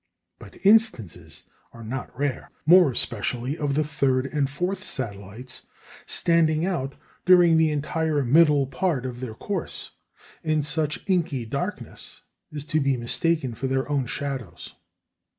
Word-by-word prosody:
But - - -14
instances 115 - +2 0.3
are 115 - -11
not 125 +2 -6
rare, 140 -1 -2 0.2
more 175 0 +7
especially 120 +2 -1
of 145 -3 -2
the 155 - +2
third 135 -3 0
and 140 -1 -1
fourth 180 +6 -3
satellites 115 - -6 0.4
standing 165 -1 +3
out, 140 -8 -2 0.3
during 175 -2 +6
the 160 -1 +4
entire 150 0 -1
middle 145 +1 +4
part 135 0 -1
of 125 -1 -5
their 120 -4 -6
course, 195 - -5 0.5
in 155 -1 0
such 150 0 -2
inky 160 -10 0
darkness 145 - -6 0.3
as 150 -1 -6
to 155 - +4
be 135 -2 +1
mistaken 130 +3 0
for 135 +4 -4
their 135 0 -1
own 135 -3 0
shadows. 130 -10 -6
145 Hz, 135 wpm, -25 LUFS, 130-160 Hz, 0.5 s, more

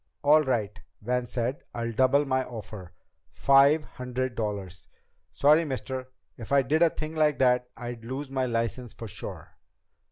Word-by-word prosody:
"All 150 +2 +6
right," 115 -6 -1 0.2
Van 125 +2 -1
said, 125 +3 -2
"I'll 115 0 -2
double 130 +5 +3
my 130 -1 +1
offer. 105 -7 -9 0.4
Five 140 +3 +4
hundred 125 -1 -4
dollars!" 100 -5 -5 0.4
"Sorry, 145 - +4
mister. 130 -3 -4 0.3
If 115 +1 -9
I 140 -1 +5
did 155 +6 +1
a 170 - +6
thing 155 0 -6
like 155 -2 +2
that 125 -1 +2
I'd 120 -2 -7
lose 130 +3 -5
my 130 -1 0
license 115 +1 -2
for 115 - -8
sure." 100 - -8
125 Hz, 155 wpm, -27 LUFS, 115-140 Hz, 0.4 s, All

